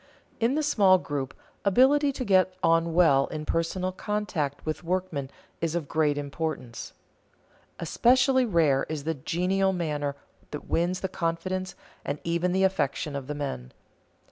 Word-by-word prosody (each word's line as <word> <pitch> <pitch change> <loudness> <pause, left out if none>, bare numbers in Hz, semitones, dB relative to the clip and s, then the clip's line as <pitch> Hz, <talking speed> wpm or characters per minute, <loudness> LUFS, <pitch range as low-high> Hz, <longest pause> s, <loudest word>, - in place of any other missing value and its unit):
_ - - -30 0.4
In 235 +4 +2
the 310 - 0
small 200 -10 +5
group, 145 -6 -4 0.3
ability 270 +8 +4
to 260 -1 -4
get 185 -2 +3
on 165 0 +3
well 140 -6 +5
in 155 -1 -5
personal 180 +3 -1
contact 185 -8 -3
with 155 +2 -3
workmen 170 -6 -2 0.3
is 165 0 -1
of 165 -4 -2
great 150 -2 +1
importance. 140 -5 -4 0.9
Especially 255 - +3
rare 165 - +2
is 155 -2 -4
the 160 +2 -1
genial 185 +6 0
manner 150 -5 -2 0.3
that 150 - -7
wins 175 +2 0
the 190 - -1
confidence 185 +1 -3 0.3
and 145 - -3
even 170 +2 0
the 190 +1 +2
affection 150 -5 0
of 135 -2 -5
the 150 - -4
men. 65 - -5
170 Hz, 150 wpm, -27 LUFS, 145-190 Hz, 0.9 s, small